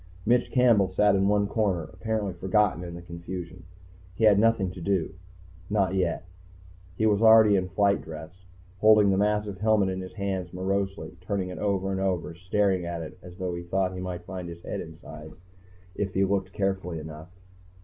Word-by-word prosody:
Mitch 120 +2 +2
Campbell 120 -6 +4
sat 100 +2 +3
in 95 0 +2
one 105 0 +3
corner, 100 -5 0
apparently 105 0 -2
forgotten 95 0 +1
in 85 -1 -7
the 85 - -9
confusion. 85 +1 -8 0.5
He 110 - -3
had 105 -2 +6
nothing 110 -4 +2
to 90 -1 -10
do. 95 -1 0 0.6
Not 100 -3 +1
yet. 90 -2 -1 0.7
He 110 - +1
was 105 -1 +3
already 110 -2 +7
in 90 -1 0
flight 100 +1 +2
dress, 80 +4 -10 0.3
holding 105 -1 +6
the 95 - +2
massive 105 -1 0
helmet 105 -2 +3
in 95 0 -3
his 95 - -9
hands 95 -4 -3
morosely, 95 0 -3
turning 95 0 -2
it 90 - -7
over 95 -2 0
and 95 0 -2
over, 90 -3 -1
staring 95 +2 0
at 85 -1 -4
it 80 +3 -10
as 90 0 -12
though 90 -1 -3
he 85 - -4
thought 90 +2 -1
he 90 - -6
might 90 -1 -5
find 90 -2 -6
his 85 0 -10
head - - -4
inside 80 -1 -10 0.6
if 100 -1 -3
he 95 +1 +3
looked 95 -1 -1
carefully 95 -4 -2
enough. 80 +1 -9
95 Hz, 185 wpm, -27 LUFS, 90-100 Hz, 0.7 s, already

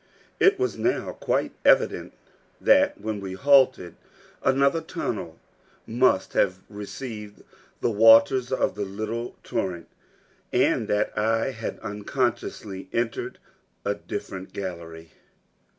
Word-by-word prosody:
It 395 +1 +5
was 390 +1 -1
now - - 0
quite - - -1
evident - - +3 0.5
that 285 +1 +4
when 110 -2 -3
we 95 -1 -6
halted, 130 -6 +3 0.4
another 140 +4 +2
tunnel - - -4 0.5
must 115 -4 +2
have 95 -1 +2
received 105 0 -8 0.4
the 120 - +1
waters 115 +4 +6
of 130 - +1
the 105 - -3
little 110 +4 -4
torrent, 85 -3 -3 0.6
and - - +2
that 105 0 0
I 115 +4 +1
had 115 -3 -5
unconsciously 105 -2 -3
entered 115 0 -2 0.5
a - - +1
different 95 0 -7
gallery. 85 -4 -7
110 Hz, 110 wpm, -25 LUFS, 100-130 Hz, 0.6 s, waters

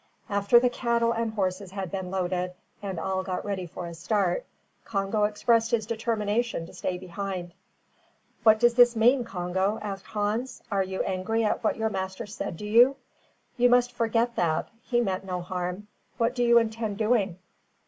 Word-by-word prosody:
After 200 +4 +5
the 250 - +3
cattle 235 -1 +1
and 230 -1 -1
horses 190 -1 -2
had 190 -2 -5
been 190 -2 -4
loaded, 180 -1 -2 0.3
and 190 -4 -4
all 190 +3 -1
got 185 -1 -4
ready 195 -3 -3
for 175 - -7
a 170 - -7
start, 205 - 0 0.4
Congo 205 0 0
expressed 225 +2 +2
his 225 -2 +1
determination 225 -3 -1
to - - -13
stay 180 - -3
behind. 185 -1 -5 0.9
"What 220 -1 +6
does 240 0 +5
this 240 0 +6
mean, 245 +3 +4
Congo?" 190 +1 -1
asked 195 -1 -5
Hans. 215 +5 -2
"Are 200 -1 +2
you 190 0 -2
angry 200 +4 -1
at 210 - 0
what 215 - +1
your 220 0 0
master 190 -1 -4
said 205 -4 -5
to 210 - -7
you? 240 +6 +6 0.6
You 245 0 +5
must 245 0 +4
forget 235 0 0
that. 160 -2 0
He 240 -1 +1
meant 190 -5 -1
no 180 -2 -3
harm. 180 +2 -4 0.3
What 230 +1 +1
do 250 - -2
you 235 0 +6
intend 220 -2 0
doing?" 210 -5 +1
210 Hz, 175 wpm, -27 LUFS, 190-230 Hz, 0.9 s, What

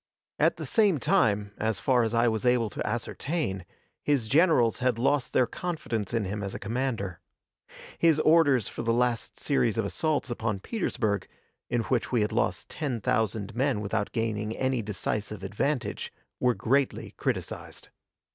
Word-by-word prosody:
At - - +4
the - - -5
same 205 -7 +3
time, 105 -4 +2
as 110 -3 0
far 125 -2 +3
as 115 0 0
I 115 +1 +4
was 110 -2 0
able 125 -3 +2
to - - -4
ascertain, 115 - -2 0.4
his 140 -6 +1
generals 140 -4 +4
had 125 -2 +1
lost 135 +2 +1
their 130 - +4
confidence 115 - -3
in 115 -2 0
him 105 +2 -3
as 100 -1 -4
a - - -5
commander. 115 -6 -2 0.8
His 165 -2 +4
orders 145 - +4
for - - -5
the 115 0 +1
last 120 -1 0
series 120 -6 +1
of 110 - +1
assaults 140 - -1
upon 110 -4 -2
Petersburg, 110 - -1 0.4
in 120 -1 +1
which 120 0 -1
we 115 -4 +3
lost 115 +3 -1
ten 135 -7 -3
thousand 110 0 0
men 130 -2 +1
without 100 0 -2
gaining 110 -1 -2
any 130 -2 0
decisive 105 0 -3
advantage, 125 +8 -2 0.3
were 125 -1 +3
greatly 135 +3 0
criticised. - - -4
115 Hz, 155 wpm, -28 LUFS, 105-135 Hz, 0.8 s, At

